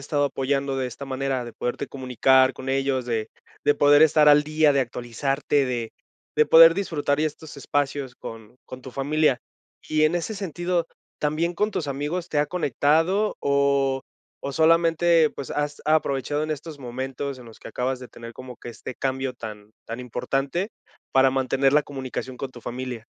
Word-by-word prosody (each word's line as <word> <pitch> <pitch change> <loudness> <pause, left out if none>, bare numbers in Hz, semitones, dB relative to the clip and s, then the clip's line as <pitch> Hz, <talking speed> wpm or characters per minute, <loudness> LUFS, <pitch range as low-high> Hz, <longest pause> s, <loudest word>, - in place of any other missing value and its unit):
estado 145 +1 0
apoyando, 135 0 -1
de 130 -1 -1
esta 130 +4 -8
manera. 135 -1 -2
De 120 - -8
poderte 125 - -3
comunicar 130 0 +3
con 130 +1 -8
ellos, 135 -1 0
de 115 -2 -2 0.4
de 145 - +4
poder 145 +1 +6
estar 155 -1 +6
al 150 0 +7
día, 155 0 +3
de 140 - +2
actualizarte. 135 +4 -1
De 120 -3 -3 0.4
de 150 - +5
poder 165 +1 +9
disfrutar, 150 -7 -1
ya 155 - +2
estos 155 0 -8
espacios, 140 -2 -2
con 115 0 -10
con 130 0 -10
tu 130 - -9
familia. 140 0 +1 0.5
Y 155 0 +2
en 155 +2 +3
ese 175 +5 -2
sentido, 175 -3 -2 0.3
¿también 155 +4 0
con 210 +5 0
tus 165 - -3
amigos, 150 +6 -3
te 150 - -1
ha 150 - +2
conectado? 165 - +1
O 140 -1 +2 0.4
o 140 - -4
solamente, 165 0 +4
pues, 140 - -8
has 145 0 -3
aprovechado 150 -1 +1
en 155 - -3
estos 155 0 -5
momentos, 130 +1 -5
en 125 - -12
los 115 -1 -14
que - - -9
acabas 130 +1 -2
de 125 - -9
tener, 115 0 -10
como 125 +1 -10
que 120 - -9
este 120 +2 -8
cambio 130 -1 -2
tan 105 -3 -9
tan 115 +2 -6
importante, 135 - -2 0.4
para 135 0 +5
mantener 135 +1 +1
la 150 - +5
comunicación, 130 -2 -6
con 135 - -4
tu 120 -2 -13
familia. 125 -2 -5
140 Hz, 180 wpm, -24 LUFS, 130-155 Hz, 0.5 s, poder